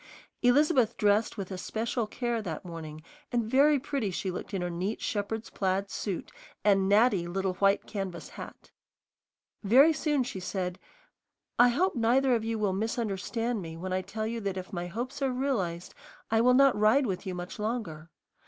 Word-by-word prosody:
Elizabeth 255 -1 +3
dressed 210 +2 +2
with 195 -1 -5
especial 220 +5 -2
care 240 0 -2
that 170 -4 -5
morning, 155 -3 -8 0.3
and 240 -2 +1
very 280 +6 +4
pretty 270 -5 -2
she 185 +1 -3
looked 180 - -6
in 190 -3 -2
her 175 - -2
neat 185 +6 -3
shepherd's 215 +2 -3
plaid 195 0 -1
suit 195 -5 -4 0.3
and 195 -2 +3
natty 205 -4 +4
little 190 +1 -1
white 195 0 +3
canvas 190 -5 -5
hat. - - -11 0.9
Very 265 +10 +6
soon 295 -3 +1
she 215 -6 -5
said, 180 -1 -3 0.8
"I 245 +1 +8
hope 355 +11 +1
neither 250 +3 +3
of 230 -2 +1
you 225 0 -2
will 205 -3 0
misunderstand 225 +2 -2
me 165 -2 -7
when 185 +2 -4
I 185 - +1
tell 215 +3 -4
you 230 +1 -3
that 195 -2 -3
if 185 +3 -7
my 175 -1 -3
hopes 240 +10 -5
are 270 - +2
realized 220 -10 -2 0.4
I 225 0 +4
will 250 +1 +5
not 275 -1 +6
ride 215 +7 +4
with 195 -2 -3
you 185 - -3
much 180 +3 -7
longer. 210 -8 -4
210 Hz, 175 wpm, -29 LUFS, 185-240 Hz, 0.9 s, I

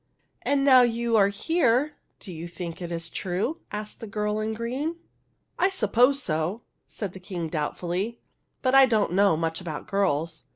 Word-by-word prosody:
" - - -46
And 280 -1 +3
now 260 -2 +8
you 235 -1 +1
are 200 -2 +6
here, 275 - +1 0.3
do 185 - -8
you 165 +1 -6
think 170 0 -7
it 175 -1 -5
is 165 -1 -3
true? 190 - -2
" - - -43
asked 210 0 -6
the 225 - -7
girl 210 +1 -1
in 220 +1 -2
green. 260 +9 -3 0.3
" - - -34
I 375 - +4
suppose 250 - +3
so," 165 +6 -1 0.2
said 200 -5 -6
the 190 - -9
King, 180 -3 -5
doubtfully; 175 +8 -2 0.2
" - - -49
but 255 -1 +2
I 270 -1 +8
don't 215 -7 +1
know 195 -3 +4
much 165 +1 -2
about 160 -4 -6
girls. 165 -5 0
205 Hz, 195 wpm, -26 LUFS, 175-240 Hz, 0.3 s, now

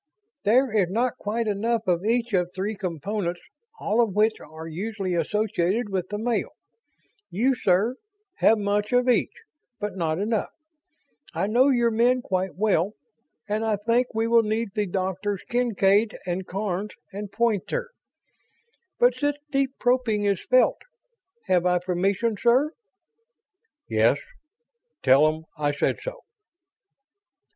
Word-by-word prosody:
"There 245 +4 +4
is 200 -5 +3
not 235 +5 -1
quite 220 +2 -2
enough 220 +2 0
of 175 -1 +1
each 235 +1 0
of 180 -2 +2
three 200 +3 -2
components, 180 0 -3 0.4
all 220 +3 +2
of 215 -5 0
which 215 +1 +2
are 160 +2 -10
usually 195 +3 -3
associated 205 +4 0
with 185 -2 -2
the 210 - -3
male. 230 +2 -1 0.8
You, 245 +8 +2
sir, 215 +2 +1 0.4
have 225 - +4
much 205 0 -1
of 245 0 +3
each, 250 - +3 0.5
but 205 -1 -4
not 160 -3 -1
enough. 210 +2 -1 0.9
I - - 0
know 245 +6 +4
your 240 -3 +3
men 245 +3 +2
quite 185 0 -2
well, 200 -1 +1 0.5
and 215 +1 -1
I 220 -1 +1
think 230 +5 +1
we 225 0 +1
will 230 0 +5
need 220 +1 -1
the 210 -1 -1
doctors 190 +2 -2
Kincaid 220 -3 +2
and 180 +1 -3
Karns 195 +1 -3 0.2
and 200 0 -6
Poynter. 235 - -1 1.1
But - - +4
such 290 0 -1
deep 275 -1 0
probing 245 -4 +1
is 200 -3 +1
felt. 255 0 +3 0.6
Have 180 -1 +2
I 180 0 +3
permission, 190 +5 0
sir?" 250 +7 +3 1.2
"Yes. 110 +5 +3 0.9
Tell 135 +3 +6
'em 155 +1 -2 0.2
I 145 -1 +1
said 145 - -1
so." - - -6
210 Hz, 135 wpm, -25 LUFS, 185-235 Hz, 1.2 s, Tell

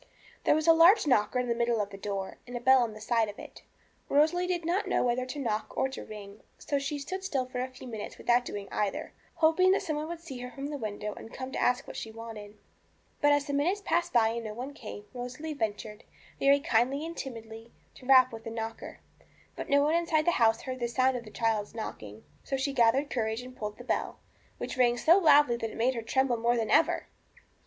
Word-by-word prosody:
There - - +5
was 310 0 0
a 330 - +8
large 340 +6 +6
knocker 250 -4 +2
in 250 0 0
the 235 - +1
middle 235 -1 0
of 205 -1 -2
the - - -8
door, 195 -1 -4
and 245 0 -5
a - - -4
bell 260 +1 +5
on 235 -2 0
one 215 0 -11
side 225 -1 +1
of 205 - -9
it. - - -11 0.5
Rosalie 320 +5 +3
did 350 -2 -2
not 360 +5 0
know - - +1
whether 250 +1 0
to 275 - -6
knock 225 -6 -3
or 265 - +2
to 265 - -7
ring, 205 -1 -10 0.2
so 285 - -2
she 275 +2 -3
stood 375 +7 -5
still 270 -9 -1
for 250 0 -6
a 255 - -2
few 260 0 -13
minutes 220 -3 -7
without 245 +1 +2
doing 205 -4 -6
either, 205 -2 -2 0.2
hoping 325 +3 +4
that 395 - 0
some 310 -5 -2
one 305 +1 -3
would 340 0 -6
see 300 -7 -8
her 250 0 -6
from 275 +3 -6
the 290 - -3
window 210 -2 -4
and 225 - -11
come 260 0 -6
to - - -3
ask 250 0 +2
what - - -9
she 225 - -5
wanted. 220 -2 -9 0.6
But 290 -1 +5
as 290 -1 +2
the 285 - -4
minutes 355 +9 0
passed 345 +1 +1
by 225 -2 +4
and 230 +1 -3
no 215 -1 -6
one 260 +5 -6
came, 210 -6 -9
Rosalie 255 +6 -5
ventured, 215 -4 -4 0.4
very 280 +1 +5
gently 270 +4 +1
and 335 +1 -6
timidly, 225 -4 -8 0.2
to 255 - -14
rap 255 -2 +6
with 225 0 -8
the - - -5
knocker. 225 0 -6 0.5
But - - -6
no 285 0 +4
one 300 +2 +2
inside 330 -2 +1
the 345 - +4
house 225 0 +4
heard 255 -1 -5
the 240 - -1
sound 255 +2 +2
of 235 -1 -5
the - - -10
child's 220 -1 -1
knocking. 110 - -7 0.2
So 270 - -2
she 275 +1 -1
gathered 260 +4 +3
courage 225 -1 -1
and 255 0 -11
pulled 210 -2 -5
the 245 - -10
bell, - - -2 0.4
which - - -5
rang 240 -1 +3
so 335 +9 +5
loudly 290 -7 +5
that 225 -1 -3
it - - -10
made 245 +3 +2
her 235 - -4
tremble 250 +2 +1
more 235 +1 +1
than 225 -1 -1
ever. 325 - +3
250 Hz, 240 wpm, -29 LUFS, 225-285 Hz, 0.6 s, a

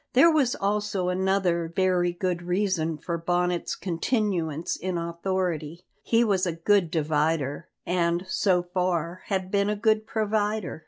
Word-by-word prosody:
There 305 +7 +7
was 275 -6 +2
also 200 -2 -1
another 180 -3 0
very 180 -2 +2
good 175 0 -2
reason 175 -3 0
for 170 +2 -4
Bonnet's 175 +1 0
continuance 170 - -1
in 185 -1 -3
authority; 170 -1 -3 0.2
he 230 0 +3
was 195 -5 +1
a 170 - -1
good 175 +2 +2
divider, 155 -1 0 0.2
and, 175 0 0
so 185 -1 +2
far, 175 -1 -2
had 190 -2 -2
been 200 0 +2
a 210 - 0
good 215 0 +1
provider. 215 -4 -1
180 Hz, 140 wpm, -26 LUFS, 170-200 Hz, 0.2 s, There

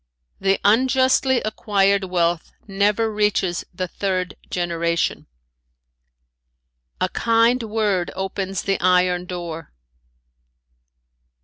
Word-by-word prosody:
"The 195 0 +1
unjustly 260 +3 +3
acquired 200 -2 +1
wealth 175 -2 0 0.2
never 210 +3 +1
reaches 205 -4 0
the 185 0 -4
third 185 -1 -2 0.2
generation. 170 -1 -1 1.7
"A - - +1
kind 230 +2 +2
word 210 -5 -1
opens 190 0 -3
the 195 -1 0
iron 180 -1 +2
door. 170 -3 -6
195 Hz, 85 wpm, -21 LUFS, 180-215 Hz, 1.7 s, unjustly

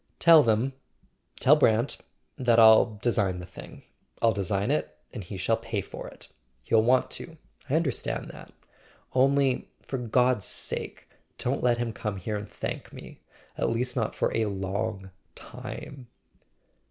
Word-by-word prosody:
"Tell 165 -2 +8
them—tell 130 +4 0
Brant—that 120 0 0
I'll 110 -1 +6
design 100 -6 +1
the 90 - -7
thing; 90 - -12 0.4
I'll 115 -1 +3
design 100 +1 -1
it, 75 0 -2 0.2
and 110 - -6
he 95 +2 -7
shall 110 +5 +1
pay 115 -3 -3
for - - -9
it. - - -9 0.4
He'll 110 - +3
want 125 +3 +2
to—I 155 -3 -7
understand 160 -6 -1
that. - - -13 0.6
Only, 135 0 +2
for 135 - -4
God's 125 -2 +2
sake, - - -4 0.3
don't 130 +3 -1
let 120 -1 +3
him 120 -1 -2
come 105 -3 -4
here 105 +3 -4
and 105 0 -5
thank - - -6
me—at - - -7
least 125 +2 -1
not 115 -4 -1
for - - 0
a 115 - +2
long 95 0 -3 0.2
time!" 125 +2 -9
115 Hz, 140 wpm, -27 LUFS, 105-130 Hz, 0.6 s, Tell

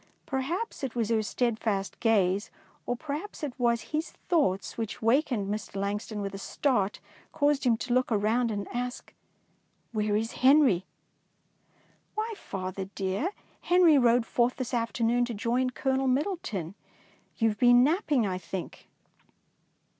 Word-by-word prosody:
Perhaps 295 - -3
it 255 -3 -3
was 230 -3 0
her 225 -1 +2
steadfast 215 -3 -1
gaze, 205 -3 +2 0.4
or 245 - 0
perhaps 305 +8 -6
it 285 -4 -2
was 235 -1 +2
his 310 +2 -1 0.2
thoughts, 280 - +1
which 225 -2 -4
wakened 235 -3 +2
Mr. 210 0 -4
Langston 205 +2 -3
with 195 0 -4
a 195 - -6
start, 210 -3 0 0.3
caused 290 -3 +1
him 235 -2 +4
to 240 - -2
look 255 +1 +3
quickly 210 -3 0
round 230 +3 +2
and 205 -2 -3
ask, 245 0 -4 0.2
— - - -41
" - - -43
Where 210 -2 0
is 225 +2 0
Henry? 260 - +5 0.4
'' - - -42
" - - -37
Why, 440 +1 -2
father 190 - -5
dear, 195 - -1 0.3
Henry 350 -5 +5
rode 240 -1 +4
forth 240 +2 +1
this 255 -1 -5
afternoon 235 0 +1
to 240 -2 -5
join 240 +4 0
Colonel 265 +1 0
Middle 295 +9 +1
ton. 185 - -5 0.6
You 225 -1 +3
have 210 -1 -5
been 245 0 +7
napping, 295 - +2
I 185 -2 -2
think. 180 +1 -7
235 Hz, 160 wpm, -28 LUFS, 205-265 Hz, 0.6 s, been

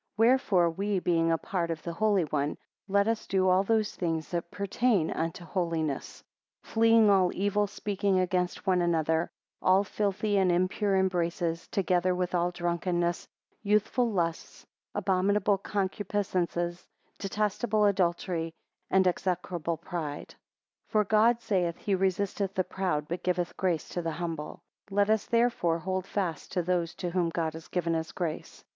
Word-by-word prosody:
WHEREFORE 215 -7 +4
we 200 +4 -1
being 165 -2 +2
apart 170 +1 -1
of 165 -2 -4
the 170 - -4
Holy 205 0 +2
One: 150 -1 -1 0.3
let 200 +1 +2
us 225 -1 -1
do 190 -1 +2
all 185 +1 +5
those 215 +1 +1
things 165 -3 -2
that 170 -1 -3
pertain 200 -2 +1
unto 165 +2 -3
holiness: 165 -5 -2 0.4
2 - - -18
Fleeing 225 -1 +5
all 185 -2 +4
evil 205 +2 +1
speaking 200 -1 -1
against 180 0 -1
one 185 -2 +3
another; 160 -1 +1 0.3
all 190 +2 +4
filthy 205 0 0
and 185 -2 +3
impure 185 +3 +1
embraces, 170 -2 0
together 180 -1 +1
with 180 0 -2
all 175 0 +2
drunkenness, 175 0 -1 0.3
youthful 215 +4 +2
lusts, 170 -5 -3 0.3
abominable 195 +1 +2
concupiscences, 185 -3 -2 0.3
detestable 210 +2 0
adultery, 175 -3 0 0.3
and 190 0 +4
execrable 175 -2 -1
pride. 155 -5 -5
3 - - -17 0.5
For 215 -1 +2
God 220 +3 +3
saith, 180 -6 0
he 205 - -2
resisteth 195 +1 0
the 185 - +2
proud, 165 -6 -2
but 175 +2 -4
giveth 180 -1 -1
grace 175 -5 -1
to 175 - -3
the 165 -1 -3
humble. 165 -2 -5 0.2
4 195 - -9
Let 205 0 +4
us 220 -1 +1
therefore 230 -8 +2
hold 185 +2 -3
fast 175 -7 -3
to 180 - 0
those 175 -1 -1
to 175 - -4
whom 175 -1 +1
God 160 -1 -2
has 160 0 -10
given 170 -2 -1
his 160 0 -2
grace. 170 -4 -5
185 Hz, 150 wpm, -29 LUFS, 170-200 Hz, 0.5 s, all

